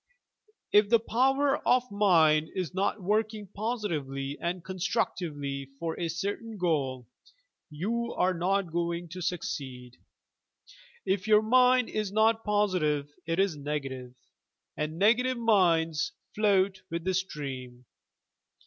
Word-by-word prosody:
If 205 Hz, 0 st, +5 dB
the 230 Hz, 0 st, +5 dB
power 270 Hz, +5 st, +2 dB
of 250 Hz, 0 st, +3 dB
mind 160 Hz, -7 st, +4 dB
is 185 Hz, -2 st, -3 dB
not 195 Hz, +1 st, -1 dB
working 215 Hz, +2 st, 0 dB
positively 155 Hz, -, -3 dB
and 175 Hz, 0 st, -3 dB
constructively 150 Hz, -7 st, -2 dB
for 165 Hz, +2 st, -3 dB
a 170 Hz, -, -1 dB
certain 205 Hz, +7 st, -4 dB
goal, 135 Hz, -, -1 dB, 0.6 s
you 230 Hz, +10 st, -2 dB
are 185 Hz, +1 st, +2 dB
not 185 Hz, +1 st, 0 dB
going 170 Hz, 0 st, -2 dB
to 180 Hz, +3 st, -7 dB
succeed. 130 Hz, -8 st, -4 dB, 1.1 s
If 190 Hz, +1 st, 0 dB
your 215 Hz, 0 st, +5 dB
mind 250 Hz, +1 st, +4 dB
is 215 Hz, -2 st, -3 dB
not 220 Hz, +2 st, +3 dB
positive 180 Hz, -9 st, +1 dB, 0.2 s
it 165 Hz, 0 st, 0 dB
is 195 Hz, -4 st, +2 dB
negative, 135 Hz, -4 st, -5 dB, 0.6 s
and 155 Hz, +1 st, -3 dB
negative 240 Hz, +6 st, +3 dB
minds 170 Hz, -9 st, +2 dB, 0.2 s
float 195 Hz, -2 st, +2 dB
with 170 Hz, 0 st, -3 dB
the 190 Hz, +1 st, 0 dB
stream. 135 Hz, -9 st, -5 dB
185 Hz, 120 wpm, -28 LUFS, 150-210 Hz, 1.1 s, If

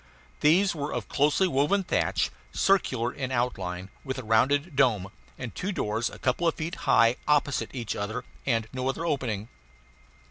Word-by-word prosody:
These 180 Hz, +6 st, +4 dB
were 145 Hz, -2 st, -4 dB
of -, -, -3 dB
closely 150 Hz, +6 st, +2 dB
woven 170 Hz, +6 st, +2 dB
thatch, 185 Hz, -, 0 dB, 0.2 s
circular 130 Hz, -11 st, +1 dB
in 130 Hz, -2 st, -4 dB
outline, 95 Hz, -7 st, -2 dB
with 130 Hz, -2 st, -4 dB
a 130 Hz, -, -5 dB
rounded 140 Hz, +8 st, +2 dB
dome, 110 Hz, -9 st, +2 dB, 0.3 s
and -, -, -6 dB
two 195 Hz, -, -3 dB
doors 115 Hz, -, -1 dB
a -, -, -11 dB
couple 130 Hz, +7 st, 0 dB
of 165 Hz, -, +2 dB
feet 160 Hz, +3 st, -4 dB, 0.2 s
high 115 Hz, +2 st, +5 dB
opposite 145 Hz, -1 st, +2 dB
each 120 Hz, -5 st, -4 dB
other, 110 Hz, +4 st, -3 dB, 0.2 s
and 115 Hz, -4 st, 0 dB
no 130 Hz, 0 st, -1 dB
other 160 Hz, +5 st, -2 dB
opening. 120 Hz, -9 st, -1 dB
130 Hz, 165 wpm, -27 LUFS, 115-150 Hz, 0.3 s, high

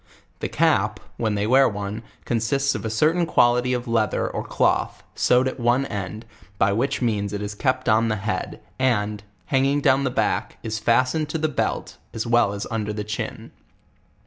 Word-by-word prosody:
The -, -, -3 dB
cap, -, -, +2 dB, 0.2 s
when 110 Hz, -3 st, 0 dB
they 100 Hz, 0 st, 0 dB
wear 130 Hz, +4 st, +5 dB
ono, 105 Hz, +1 st, -4 dB, 0.2 s
consists 135 Hz, +4 st, +1 dB
of -, -, -5 dB
a 110 Hz, -, -2 dB
certain 160 Hz, +10 st, +2 dB
quantity 125 Hz, -1 st, +3 dB
of 125 Hz, 0 st, -3 dB
leath 110 Hz, -3 st, +1 dB
er -, -, 0 dB
or -, -, -4 dB
cloth, -, -, 0 dB
sewed 125 Hz, +1 st, +3 dB
at 130 Hz, -, -4 dB
one 120 Hz, +3 st, +2 dB
end, 105 Hz, 0 st, -5 dB, 0.3 s
by 100 Hz, +1 st, +3 dB
which 130 Hz, +5 st, 0 dB
means 105 Hz, -3 st, 0 dB
it 100 Hz, -, -3 dB
is 105 Hz, 0 st, -4 dB
kept 130 Hz, +3 st, -1 dB
on 110 Hz, +1 st, +4 dB
the 110 Hz, -, 0 dB
head, 95 Hz, -2 st, -3 dB, 0.2 s
and, 105 Hz, -5 st, +1 dB, 0.3 s
hanging 135 Hz, +2 st, +3 dB
down 135 Hz, -1 st, +3 dB
the 135 Hz, -, +1 dB
back, -, -, -1 dB
is 110 Hz, -1 st, -3 dB
fastened 130 Hz, +7 st, +2 dB
to 160 Hz, -, -2 dB
the 155 Hz, 0 st, 0 dB
belt, 150 Hz, -, -2 dB, 0.2 s
as 115 Hz, -, -2 dB
well 120 Hz, -3 st, +3 dB
as 100 Hz, -, -4 dB
under 105 Hz, -2 st, -2 dB
the 105 Hz, 0 st, -4 dB
ciiin. 105 Hz, -1 st, -5 dB
115 Hz, 190 wpm, -23 LUFS, 105-130 Hz, 0.3 s, wear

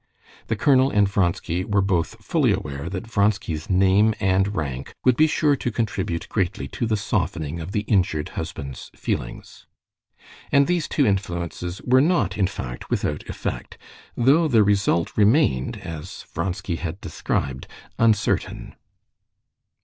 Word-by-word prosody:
The 110 Hz, -, 0 dB
colonel 130 Hz, +2 st, +4 dB
and 105 Hz, -5 st, +3 dB
Vronsky 90 Hz, -2 st, 0 dB
were 100 Hz, 0 st, +1 dB
both 90 Hz, -4 st, -1 dB
fully -, -, +2 dB
aware 70 Hz, +4 st, -3 dB
that 95 Hz, +3 st, -5 dB
Vronsky's 100 Hz, -7 st, 0 dB
name 95 Hz, +3 st, +4 dB
and 95 Hz, +1 st, +1 dB
rank 70 Hz, -4 st, -4 dB
would 130 Hz, -2 st, +5 dB
be 155 Hz, +4 st, +5 dB
sure 150 Hz, -1 st, +2 dB
to 120 Hz, -, -2 dB
contribute 95 Hz, -7 st, -2 dB
greatly 90 Hz, -9 st, -1 dB
to 120 Hz, -, -2 dB
the 110 Hz, -1 st, +1 dB
softening 85 Hz, -5 st, -2 dB
of 85 Hz, +3 st, -6 dB
the 105 Hz, -, 0 dB
injured 90 Hz, -8 st, 0 dB
husband's 70 Hz, -2 st, -6 dB
feelings. -, -, -5 dB, 0.8 s
And 140 Hz, 0 st, +5 dB
these 175 Hz, -2 st, 0 dB
two 145 Hz, -, +1 dB
influences 90 Hz, -2 st, -2 dB
were 130 Hz, +1 st, +4 dB
not 140 Hz, -, +2 dB
in 95 Hz, -3 st, +2 dB
fact 60 Hz, -10 st, -7 dB
without 75 Hz, -, -2 dB
effect; -, -, -5 dB, 0.4 s
though 140 Hz, +7 st, +4 dB
the 115 Hz, -7 st, +5 dB
result 100 Hz, -5 st, +1 dB
remained, 105 Hz, -, +3 dB
as 80 Hz, +2 st, -8 dB
Vronsky 90 Hz, 0 st, -2 dB
had 85 Hz, -2 st, -5 dB
described, 65 Hz, -1 st, -3 dB, 0.3 s
uncertain. 110 Hz, -3 st, +1 dB
95 Hz, 140 wpm, -23 LUFS, 85-110 Hz, 0.8 s, would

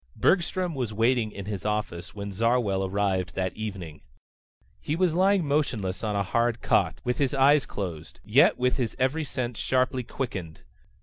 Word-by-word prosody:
Bergstrom 180 Hz, -1 st, +1 dB
was 120 Hz, -6 st, -3 dB
waiting 115 Hz, 0 st, +2 dB
in 100 Hz, -1 st, -7 dB
his 100 Hz, -3 st, -4 dB
office 105 Hz, -5 st, -3 dB
when 100 Hz, -1 st, -5 dB
Zarwell 110 Hz, -2 st, +1 dB
arrived 95 Hz, -3 st, -1 dB
that 95 Hz, -1 st, -2 dB
evening. 95 Hz, -8 st, -6 dB, 0.8 s
He 150 Hz, -, -2 dB
was 180 Hz, -1 st, +2 dB
lying 190 Hz, 0 st, +3 dB
motionless 120 Hz, -11 st, -1 dB
on 105 Hz, -2 st, -1 dB
a 100 Hz, -, +1 dB
hard 115 Hz, +3 st, 0 dB
cot, 80 Hz, -4 st, +2 dB
with 125 Hz, 0 st, -1 dB
his 140 Hz, -2 st, +1 dB
eyes 140 Hz, +1 st, +4 dB
closed, 85 Hz, -6 st, -6 dB
yet -, -, +5 dB
with 125 Hz, 0 st, +1 dB
his 120 Hz, -4 st, -2 dB
every 135 Hz, +5 st, +1 dB
sense 125 Hz, -5 st, -4 dB
sharply 130 Hz, 0 st, +1 dB
quickened. 95 Hz, -, -5 dB
115 Hz, 165 wpm, -26 LUFS, 95-130 Hz, 0.8 s, yet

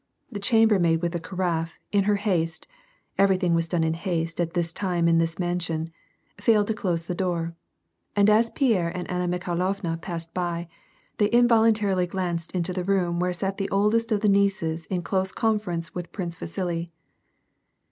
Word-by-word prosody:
The 205 Hz, -, -5 dB
chambermaid 200 Hz, -6 st, +3 dB
with 170 Hz, -, +1 dB
the 170 Hz, -, -2 dB
carafe, 170 Hz, -2 st, -2 dB
in 200 Hz, -1 st, +2 dB
her 210 Hz, 0 st, +3 dB
haste 175 Hz, -6 st, -1 dB, 0.5 s
(every 195 Hz, -1 st, +5 dB
thing 180 Hz, -2 st, +1 dB
was 165 Hz, 0 st, +1 dB
done 170 Hz, -1 st, 0 dB
in 160 Hz, 0 st, +1 dB
haste 165 Hz, -1 st, -2 dB
at 170 Hz, +1 st, -3 dB
this 170 Hz, -1 st, 0 dB
time 175 Hz, -3 st, 0 dB
in 165 Hz, 0 st, +4 dB
this 165 Hz, 0 st, 0 dB
mansion) 170 Hz, -2 st, -2 dB, 0.5 s
failed 215 Hz, -3 st, +4 dB
to -, -, +2 dB
close 175 Hz, -6 st, -2 dB
the 180 Hz, -, -3 dB
door, 170 Hz, -2 st, -2 dB, 0.6 s
and 200 Hz, 0 st, +4 dB
as 220 Hz, +2 st, +4 dB
Pierre 220 Hz, -, +1 dB
and 180 Hz, -, -4 dB
Anna 180 Hz, 0 st, -1 dB
Mikhailovna 175 Hz, -1 st, -2 dB
passed 165 Hz, -2 st, -6 dB
by, 175 Hz, -1 st, -2 dB, 0.5 s
they 205 Hz, -, +4 dB
involuntarily 220 Hz, -6 st, +3 dB
glanced 175 Hz, -2 st, -3 dB
into 180 Hz, 0 st, -1 dB
the 180 Hz, 0 st, -2 dB
room 180 Hz, -3 st, +1 dB
where 180 Hz, 0 st, +1 dB
sat 195 Hz, +2 st, -2 dB
the 195 Hz, -1 st, -2 dB
oldest 215 Hz, +4 st, +2 dB
of 210 Hz, -2 st, +2 dB
the 215 Hz, -, +2 dB
nieces 195 Hz, -5 st, +1 dB
in 180 Hz, -2 st, -2 dB
close 190 Hz, +1 st, 0 dB
conference 185 Hz, -6 st, -1 dB
with 175 Hz, -1 st, -6 dB
Prince 175 Hz, -4 st, -4 dB
Vasili. 170 Hz, 0 st, -3 dB
180 Hz, 175 wpm, -25 LUFS, 170-200 Hz, 0.6 s, every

